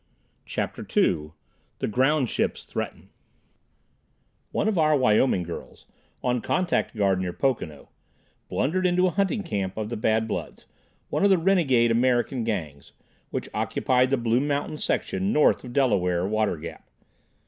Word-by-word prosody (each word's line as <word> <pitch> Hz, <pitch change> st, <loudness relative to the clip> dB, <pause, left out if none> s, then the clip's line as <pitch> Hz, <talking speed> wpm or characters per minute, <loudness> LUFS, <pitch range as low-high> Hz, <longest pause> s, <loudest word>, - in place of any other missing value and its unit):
CHAPTER -, -, -3 dB, 0.2 s
II 75 Hz, +1 st, +2 dB, 0.4 s
The -, -, -2 dB
"Ground 130 Hz, +4 st, +2 dB
Ships" -, -, -1 dB
Threaten -, -, -6 dB, 1.4 s
One -, -, 0 dB
of 210 Hz, -5 st, +1 dB
our 155 Hz, -1 st, +4 dB
Wyoming 110 Hz, -5 st, +3 dB
girls, 85 Hz, 0 st, -9 dB, 0.4 s
on 125 Hz, -1 st, +1 dB
contact 180 Hz, -4 st, 0 dB
guard 100 Hz, -3 st, +2 dB
near 90 Hz, -1 st, -2 dB
Pocono, 90 Hz, -, -2 dB, 0.6 s
blundered 185 Hz, +8 st, +1 dB
into 180 Hz, +1 st, +3 dB
a 185 Hz, -, +2 dB
hunting 200 Hz, +4 st, 0 dB
camp 95 Hz, -, -3 dB
of 110 Hz, -1 st, -3 dB
the 120 Hz, -, -4 dB
Bad 110 Hz, +1 st, +1 dB
Bloods, -, -, -5 dB, 0.4 s
one -, -, 0 dB
of 200 Hz, -, +5 dB
the 190 Hz, -, +5 dB
renegade 160 Hz, -10 st, +3 dB
American 120 Hz, +1 st, +1 dB
Gangs, 80 Hz, -11 st, -4 dB, 0.4 s
which -, -, -4 dB
occupied 130 Hz, 0 st, +1 dB
the 135 Hz, -, +2 dB
Blue 120 Hz, 0 st, +1 dB
Mountain 145 Hz, +1 st, -2 dB
section 195 Hz, +2 st, -1 dB
north 150 Hz, -, +3 dB
of 125 Hz, -, -8 dB
Delaware 90 Hz, -9 st, +1 dB
Water 110 Hz, -3 st, 0 dB
Gap. 80 Hz, +1 st, -9 dB
125 Hz, 145 wpm, -25 LUFS, 105-150 Hz, 1.4 s, of